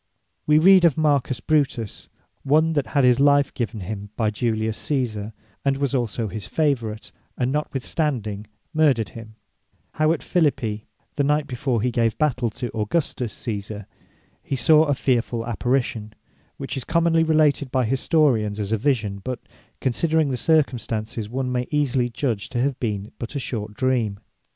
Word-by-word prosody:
We 150 0 +5
read 185 +3 +7
of 165 -4 +4
Marcus 140 -5 +1
Brutes, 135 -8 -1 0.3
(one 155 +4 +3
that 145 -3 0
had 140 -2 +1
his 125 0 +5
life 140 0 +4
given 110 -3 -3
him 100 +2 -6
by 110 -2 +1
Julius 110 0 -1
Caesar, 115 -7 -2 0.3
and 135 -1 +1
was 140 -1 -1
also 120 -3 -1
his 100 0 -6
favorite, 120 -8 -1 0.3
and 125 0 0
notwithstanding 130 -7 -2 0.3
murthered 140 - +3
him,) 110 +2 -11 0.6
how 155 +1 +2
at 165 - -1
Phillipi, 115 -10 0 0.3
the 145 - +2
night 150 +1 +2
before 125 -3 -1
he 125 - +1
gave 115 -2 +1
battell 125 -6 +1
to 120 -2 -5
Augustus 120 +1 -1
Caesar, 105 -2 -5 0.6
he 140 - -3
saw 155 +4 +5
a 145 -2 +1
fearfull 120 -3 0
apparition, 120 -2 -1 0.4
which - - -5
is 135 - -3
commonly 165 +1 +2
related 155 -4 +2
by 130 -1 +1
Historians 120 -4 +2
as 105 0 -3
a 110 - +2
Vision: 105 -6 0
but 125 -1 -4 0.4
considering 155 +3 +1
the - - 0
circumstances, 115 -6 0
one 130 +1 -2
may 125 0 -1
easily 135 -4 +1
judge 115 -4 -2
to 120 - -2
have 135 +1 0
been 105 -3 -3
but 120 +5 -6
a - - 0
short 105 -5 -5
Dream. 120 -6 0
125 Hz, 160 wpm, -23 LUFS, 110-145 Hz, 0.6 s, read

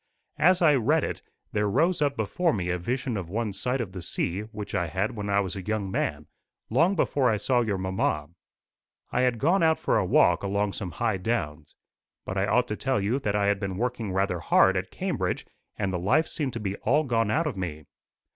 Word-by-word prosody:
As 180 +4 +4
I 155 -3 +6
read 125 -6 +2
it, - - -3 0.3
there 105 -1 0
rose 165 - +2
up 140 -2 +1
before 160 - +1
me 90 -3 -1
a 90 - -1
vision 125 +5 -2
of 90 -4 -5
one 110 +1 -2
sight 125 +6 -1
of 110 -6 -3
the 90 -1 -7
sea 85 +2 -2
which 105 -1 -8
I 85 - 0
had 95 +6 -2
when 105 -1 -4
I 100 0 +3
was 95 -2 -4
a 95 - -4
young 105 0 -2
man, 75 -5 -2 0.5
long 165 - +3
before 140 -6 +2
I 110 - +2
saw 125 +3 +2
your 105 -4 -1
mamma. 95 -5 -1 0.8
I 125 - +1
had 125 -2 +2
gone 170 - +2
out 160 -1 +4
for - - +1
a - - +1
walk 90 -2 +4
along 100 0 -1
some 95 - -5
high 105 - 0
downs. 80 -8 -3 0.5
But 95 - -4
I 95 +1 +1
ought 125 +4 +2
to 105 - -1
tell 130 +1 0
you 105 +7 0
that 105 -6 -1
I 100 -1 +2
had 100 0 +2
been 95 -2 -3
working 120 -2 -2
rather 95 -1 0
hard - - +4
at - - -2
Cambridge, - - -2 0.3
and 95 -2 -1
the 90 - -1
life 155 - +2
seemed 140 -5 -3
to 115 - -4
be 100 -2 -3
all 145 +7 +2
gone 115 -5 +1
out 160 +9 +1
of 150 -7 -2
me. 80 -5 -5
105 Hz, 225 wpm, -27 LUFS, 95-125 Hz, 0.8 s, I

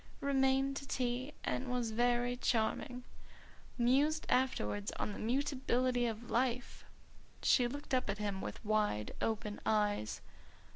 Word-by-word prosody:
"'Remained 270 0 +2
to 275 - -7
tea, 255 +2 -1
and 255 - -2
was 245 -2 -1
very 240 +1 +2
charming. 245 +1 0 0.7
Mused 280 +6 +3
afterwards 105 - +1
on 210 - -3
the - - -7
mutability 255 -1 +1
of 225 +1 -5
life!'" 245 +1 0 0.6
She 245 -2 +5
looked 285 +3 -6
up 255 - +2
at 200 - -1
him 200 -2 -2
with - - -6
wide 210 - +1
open 210 -2 -2
eyes. 205 - +1
245 Hz, 130 wpm, -35 LUFS, 215-260 Hz, 0.7 s, She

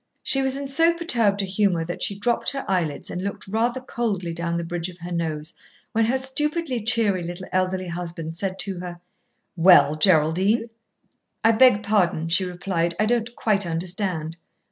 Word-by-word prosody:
She 270 - +3
was 265 0 0
in 280 0 -4
so 330 +5 +3
perturbed 230 - +1
a - - -1
humour 190 -3 +1
that 175 - -6
she 200 - -1
dropped 235 +3 +1
her 275 - -4
eyelids 175 -6 -1
and 180 - -4
looked 200 0 -5
rather 230 +5 0
coldly 215 -9 -3
down 170 0 -2
the 170 - -2
bridge 175 +1 -4
of 180 - -12
her 175 0 -8
nose 160 -2 -3 0.4
when 225 -1 +2
her 250 +4 +1
stupidly 275 0 -2
cheery 215 -5 +2
little 175 +2 -6
elderly 185 0 0
husband 170 -2 -5
said 190 +1 -3
to 190 -2 -4
her, 175 -1 -7 0.6
"Well, 170 -4 +6
Geraldine?" 185 +7 +2 0.7
"I 225 - +6
beg 225 -2 +5
pardon," 180 -6 +1
she 185 +3 +2
replied. 175 -1 -2
"I 215 - +3
don't 240 +1 -1
quite 205 -4 +1
understand." 170 -1 -2
190 Hz, 175 wpm, -23 LUFS, 170-230 Hz, 0.7 s, Well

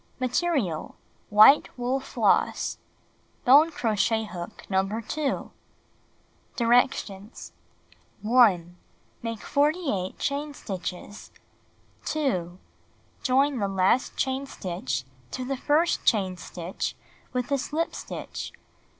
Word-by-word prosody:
Material: 255 - -1 0.3
White 215 +7 +7
wool 250 +2 0
floss. 270 - +1 0.7
Bone 285 +6 +7
crochet 220 -5 +1
hook 180 0 -8
No. 195 +3 0
2. 285 +5 -3 1.0
Directions: 230 -4 +1 0.7
1. 200 -7 +4 0.4
Make 230 -2 -4
48 285 - 0
chain 285 +1 -2
stitches. 190 0 -6 0.8
2. 185 - -1 0.6
Join 270 0 +2
the 200 - 0
last 195 +7 +1
chain 265 +1 -1
stitch 180 - -4 0.3
to 255 - -4
the 270 +1 -2
first 300 +6 +1
chain 190 -5 +2
stitch 175 0 -5 0.4
with 250 +2 -2
a 280 - +2
slip 315 +4 -2
stitch. - - -6
240 Hz, 95 wpm, -26 LUFS, 195-275 Hz, 1.0 s, White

